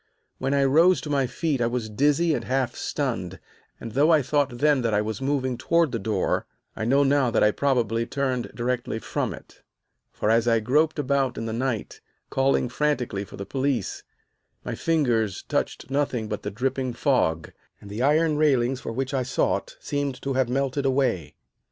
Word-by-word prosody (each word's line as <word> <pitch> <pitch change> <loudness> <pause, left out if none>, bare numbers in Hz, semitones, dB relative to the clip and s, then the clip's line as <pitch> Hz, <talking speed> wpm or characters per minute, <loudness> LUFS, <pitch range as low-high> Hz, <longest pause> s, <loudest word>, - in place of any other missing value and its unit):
When 135 +2 0
I 140 - +3
rose 165 +7 +5
to 150 - -5
my 135 -2 +2
feet 140 +1 -1
I 115 - +3
was 120 -2 -2
dizzy 145 +9 +2
and - - -2
half 130 -1 0
stunned, - - -3 0.4
and 115 - -7
though 140 +7 +3
I 155 -3 +4
thought 140 -2 0
then 145 0 +3
that 115 -3 0
I 105 - +3
was 110 +1 -4
moving 130 -3 -1
toward 170 -4 +2
the 115 - -2
door, 100 -2 -1 0.3
I 110 - -3
know 135 +4 +4
now 140 -2 +3
that - - +2
I 105 - +5
probably 115 -4 0
turned 130 -3 -2
directly 120 -2 -2
from - - -2
it; - - -12 0.5
for, 105 - 0
as 115 +1 +3
I 115 -1 +4
groped 150 +9 +2
about 135 -2 0
in 115 - -3
the 110 - -3
night, 120 -2 -3 0.3
calling 135 -1 +2
frantically 125 -6 -1
for - - -11
the 100 - -5
police, 130 -1 -1 0.6
my - - -3
fingers 120 - 0
touched - - -3
nothing 135 -5 0
but 105 -1 -4
the - - -4
dripping 130 +3 -2
fog, 115 - +1 0.3
and - - -13
the 105 +4 -5
iron 150 +3 +3
railings 135 -4 +2
for - - -5
which 130 +3 -3
I 135 - +1
sought 125 0 -1
seemed 140 -2 -3
to 135 - -1
have 130 -2 +1
melted 135 +2 0
away. 130 - 0
130 Hz, 190 wpm, -25 LUFS, 115-140 Hz, 0.6 s, rose